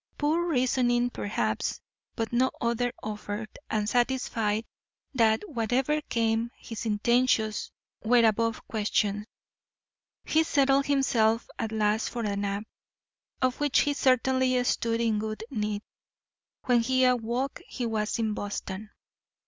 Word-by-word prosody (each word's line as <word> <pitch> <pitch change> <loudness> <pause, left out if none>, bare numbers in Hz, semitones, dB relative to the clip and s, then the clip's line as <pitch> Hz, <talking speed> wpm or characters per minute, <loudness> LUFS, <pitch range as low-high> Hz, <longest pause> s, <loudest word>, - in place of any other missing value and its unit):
Poor 320 +4 +1
reasoning, 245 -4 +2
perhaps, 110 - -2 0.4
but 225 +1 -3
no 255 +2 +3
other 235 +1 0
offered, 210 0 -5 0.2
and 210 -1 0
satisfied 230 -3 0 0.5
that 230 - +2
whatever 265 - 0
came 230 -3 0
his 225 0 -6
intentions 220 0 +1 0.3
were 235 +1 +5
above 230 +1 0
question, 210 -1 0 1.0
he 315 - +3
settled 275 -3 +3
himself 240 -5 +2
at 220 - -2
last 215 0 +1
for 235 - -4
a 205 -2 -1
nap, 200 0 -2 0.8
of 255 -1 +1
which 290 -2 +3
he 290 - +1
certainly 260 -1 +2
stood 230 -2 0
in 225 -2 +1
good 215 0 -4
need. 210 -3 -2 0.8
When 245 -2 +4
he 260 +2 +2
awoke 250 +2 0
he 245 - -4
was 220 -1 -1
in 220 -2 0
Boston. 205 0 -5
230 Hz, 125 wpm, -28 LUFS, 215-255 Hz, 1.0 s, were